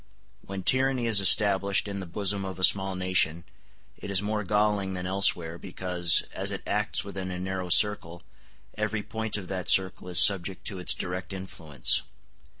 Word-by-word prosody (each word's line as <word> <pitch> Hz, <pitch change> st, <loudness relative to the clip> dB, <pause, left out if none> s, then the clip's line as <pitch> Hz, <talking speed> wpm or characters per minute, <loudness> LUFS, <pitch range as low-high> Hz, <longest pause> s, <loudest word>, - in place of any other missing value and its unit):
When 95 Hz, -1 st, -8 dB
tyranny 130 Hz, 0 st, +2 dB
is 110 Hz, -3 st, +4 dB
established 100 Hz, +1 st, +3 dB
in 100 Hz, -1 st, -6 dB
the 95 Hz, -, -8 dB
bosom 100 Hz, +3 st, 0 dB
of 95 Hz, -2 st, -7 dB
a 95 Hz, -, -7 dB
small 95 Hz, +1 st, +2 dB
nation, 90 Hz, -3 st, 0 dB, 0.6 s
it -, -, -9 dB
is 100 Hz, -2 st, +2 dB
more 105 Hz, +1 st, -3 dB
galling 105 Hz, -1 st, -1 dB
than 90 Hz, 0 st, -6 dB
elsewhere, 90 Hz, -3 st, 0 dB
because, 90 Hz, -1 st, +1 dB
as -, -, -2 dB
it -, -, -6 dB
acts -, -, -2 dB
within 95 Hz, -2 st, -7 dB
a 90 Hz, -, -6 dB
narrow 95 Hz, -1 st, -5 dB
circle, 85 Hz, -3 st, +2 dB, 0.5 s
every 105 Hz, 0 st, -3 dB
point 110 Hz, -1 st, -5 dB
of 95 Hz, -3 st, -9 dB
that 90 Hz, -2 st, -3 dB
circle 95 Hz, -1 st, +3 dB
is 90 Hz, -, +3 dB
subject 95 Hz, -2 st, +2 dB
to 95 Hz, -3 st, -5 dB
its 90 Hz, -, 0 dB
direct 90 Hz, +1 st, -6 dB
influence. 80 Hz, -8 st, 0 dB
95 Hz, 170 wpm, -26 LUFS, 90-100 Hz, 0.6 s, is